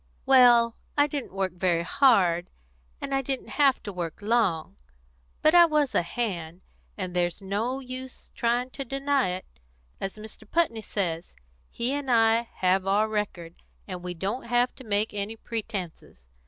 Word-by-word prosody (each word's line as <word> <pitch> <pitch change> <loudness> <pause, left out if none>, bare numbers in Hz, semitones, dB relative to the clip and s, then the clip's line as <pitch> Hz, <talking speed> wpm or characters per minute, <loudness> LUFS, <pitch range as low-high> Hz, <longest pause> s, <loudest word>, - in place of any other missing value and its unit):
"Well, 240 -3 +6 0.2
I 290 - +6
didn't 290 -3 -5
work 190 -1 -1
very 175 -2 +1
hard, 180 -7 +3 0.5
and 275 - -4
I 270 - +2
didn't 270 0 -4
have 275 -2 +3
to 205 - -6
work 170 -3 -4
long. 210 -7 0 0.7
But 310 - +5
I 345 -1 +9
was 300 -3 +1
a - - +3
hand, 175 -3 -4 0.4
and 185 -3 -4
there's 175 -1 0
no 215 +7 -2
use 255 0 -8
trying 240 +2 0
to 275 - -5
deny 275 0 0
it. 185 +1 -4 0.5
As 195 +2 -4
Mr. 215 0 -10
Putney 315 -10 +1
says, 175 -6 -3 0.3
he 240 +3 -2
and 285 -2 -3
I 230 0 +3
have 185 +1 +1
our 205 +3 +3
record, 200 -6 -4 0.3
and 180 -2 -6
we 180 0 -5
don't 200 +9 -3
have 245 +1 +2
to 260 - -10
make 210 -1 0
any 205 +2 -3
pretences. 200 - -6
220 Hz, 160 wpm, -27 LUFS, 185-255 Hz, 0.7 s, I